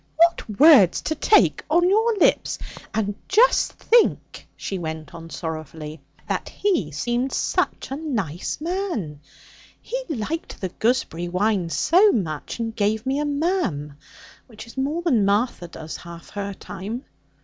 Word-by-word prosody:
What 330 Hz, -11 st, +2 dB
words 280 Hz, -, +7 dB
you 315 Hz, -, 0 dB
take 420 Hz, +7 st, +4 dB
on 345 Hz, +3 st, +4 dB
your 440 Hz, +4 st, +3 dB
lips! 370 Hz, -, +2 dB, 0.3 s
And 205 Hz, -2 st, -1 dB
just 480 Hz, +5 st, +4 dB
think,' 470 Hz, 0 st, +1 dB
she 195 Hz, -, -4 dB
went 160 Hz, -2 st, -6 dB
on 165 Hz, 0 st, -9 dB
sorrowfully, 155 Hz, -2 st, -6 dB, 0.3 s
'that -, -, -2 dB
he 360 Hz, -, 0 dB
seemed 240 Hz, -, -1 dB
such -, -, -1 dB
a 270 Hz, -, -2 dB
nice 215 Hz, -, -3 dB
man. 325 Hz, -, -3 dB, 0.6 s
He -, -, -4 dB
liked 305 Hz, +4 st, -4 dB
the 185 Hz, -, -3 dB
gooseberry 180 Hz, -6 st, -1 dB
wine 185 Hz, 0 st, 0 dB
so 375 Hz, -, +4 dB
much, 155 Hz, -9 st, -3 dB
and 225 Hz, -1 st, -3 dB
gave 215 Hz, +2 st, 0 dB
me 270 Hz, +2 st, 0 dB
a 295 Hz, -, 0 dB
"ma'am," 285 Hz, -, -1 dB, 0.5 s
which 220 Hz, -2 st, -11 dB
is 230 Hz, -, -14 dB
more 290 Hz, +6 st, -1 dB
than 255 Hz, -, +3 dB
Martha 200 Hz, -2 st, +1 dB
does 160 Hz, -1 st, -8 dB
half 170 Hz, -1 st, -11 dB
her 200 Hz, -1 st, -4 dB
time. 220 Hz, +11 st, -7 dB
220 Hz, 145 wpm, -23 LUFS, -, 0.6 s, words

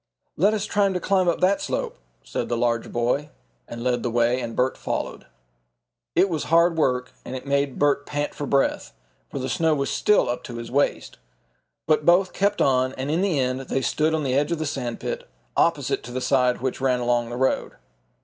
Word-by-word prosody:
"Let 205 Hz, +6 st, +3 dB
us 210 Hz, -1 st, -2 dB
try 200 Hz, -1 st, +2 dB
to 180 Hz, -, -1 dB
climb 190 Hz, 0 st, +1 dB
up 170 Hz, -, +1 dB
that 195 Hz, +2 st, +3 dB
slope," -, -, -3 dB, 0.3 s
said -, -, -4 dB
the 120 Hz, -, 0 dB
larger 115 Hz, -1 st, 0 dB
boy 125 Hz, +5 st, 0 dB, 0.4 s
and 120 Hz, 0 st, -7 dB
led 125 Hz, -1 st, +1 dB
the 120 Hz, -, -1 dB
way, 120 Hz, +2 st, +2 dB
and 115 Hz, -2 st, -5 dB
Bert 130 Hz, +1 st, +1 dB
followed. -, -, -4 dB, 0.9 s
It 185 Hz, +3 st, +5 dB
was 160 Hz, -5 st, -2 dB
hard 170 Hz, +1 st, +4 dB
work 125 Hz, -5 st, 0 dB
and 130 Hz, -, -6 dB
it 130 Hz, -, -7 dB
made 140 Hz, -1 st, 0 dB
Bert 145 Hz, -1 st, +1 dB
pant 145 Hz, 0 st, -2 dB
for 145 Hz, -, -5 dB
breath, 140 Hz, 0 st, 0 dB, 0.4 s
for -, -, -6 dB
the 130 Hz, -1 st, -3 dB
snow 160 Hz, +5 st, +2 dB
was 140 Hz, -1 st, -1 dB
still 210 Hz, -, +3 dB
up 120 Hz, 0 st, -3 dB
to 120 Hz, -, -7 dB
his 115 Hz, 0 st, -7 dB
waist. 140 Hz, +2 st, 0 dB, 0.7 s
But 155 Hz, 0 st, +2 dB
both 180 Hz, +4 st, +4 dB
kept 200 Hz, +2 st, +1 dB
on, 130 Hz, -1 st, +2 dB
and 135 Hz, +2 st, -3 dB
in 165 Hz, +3 st, +1 dB
the 190 Hz, -6 st, +1 dB
end 130 Hz, -1 st, 0 dB
they 135 Hz, 0 st, -2 dB
stood 155 Hz, +4 st, +1 dB
on 155 Hz, -, -1 dB
the 130 Hz, -2 st, 0 dB
edge 145 Hz, +4 st, +1 dB
of 170 Hz, -, 0 dB
the 155 Hz, -, -3 dB
sand 125 Hz, -5 st, -3 dB
pit, -, -, -5 dB, 0.3 s
opposite -, -, +1 dB
to 120 Hz, -, -9 dB
the 130 Hz, -, -2 dB
side 125 Hz, -2 st, +2 dB
which 130 Hz, 0 st, -2 dB
ran 130 Hz, -2 st, +2 dB
along 120 Hz, -1 st, 0 dB
the 120 Hz, -, -5 dB
road. 130 Hz, +1 st, 0 dB
135 Hz, 215 wpm, -24 LUFS, 125-160 Hz, 0.9 s, It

